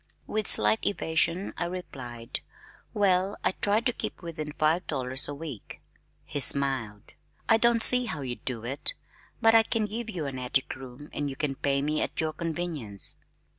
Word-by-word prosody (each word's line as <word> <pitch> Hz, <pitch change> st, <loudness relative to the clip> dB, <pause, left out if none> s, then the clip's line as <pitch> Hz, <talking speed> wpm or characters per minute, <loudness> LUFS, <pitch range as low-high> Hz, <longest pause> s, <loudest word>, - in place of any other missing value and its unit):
With 215 Hz, -1 st, 0 dB
slight 105 Hz, +1 st, +4 dB
evasion 170 Hz, 0 st, 0 dB
I 175 Hz, -, -1 dB
replied, 130 Hz, -10 st, -6 dB, 0.5 s
"Well, 195 Hz, -1 st, +2 dB
I -, -, +3 dB
try 205 Hz, +3 st, +1 dB
to 245 Hz, 0 st, 0 dB
keep -, -, -6 dB
within 155 Hz, -3 st, -5 dB
five 155 Hz, +4 st, +1 dB
dollars 130 Hz, -2 st, 0 dB
a 145 Hz, -, -5 dB
week." 145 Hz, -7 st, -8 dB, 0.5 s
He 145 Hz, -, -4 dB
smiled. 130 Hz, -7 st, +2 dB, 0.3 s
"I 225 Hz, -, +6 dB
don't 235 Hz, 0 st, +6 dB
see 250 Hz, 0 st, +8 dB
how 155 Hz, -11 st, -4 dB
you 125 Hz, -2 st, -4 dB
do 120 Hz, -3 st, -5 dB
it, 140 Hz, -, -1 dB, 0.5 s
but 225 Hz, 0 st, +6 dB
I 225 Hz, -, +8 dB
can 220 Hz, -1 st, -1 dB
give 225 Hz, +2 st, -5 dB
you 175 Hz, -8 st, -4 dB
an 135 Hz, -2 st, -5 dB
attic 130 Hz, +2 st, -1 dB
room 130 Hz, +2 st, -11 dB
and 145 Hz, -1 st, -2 dB
you 135 Hz, -, -6 dB
can 145 Hz, -1 st, -1 dB
pay 140 Hz, 0 st, 0 dB
me 155 Hz, +1 st, 0 dB
at -, -, -3 dB
your 155 Hz, -1 st, 0 dB
convenience." 160 Hz, -, -3 dB
155 Hz, 175 wpm, -28 LUFS, 130-190 Hz, 0.5 s, see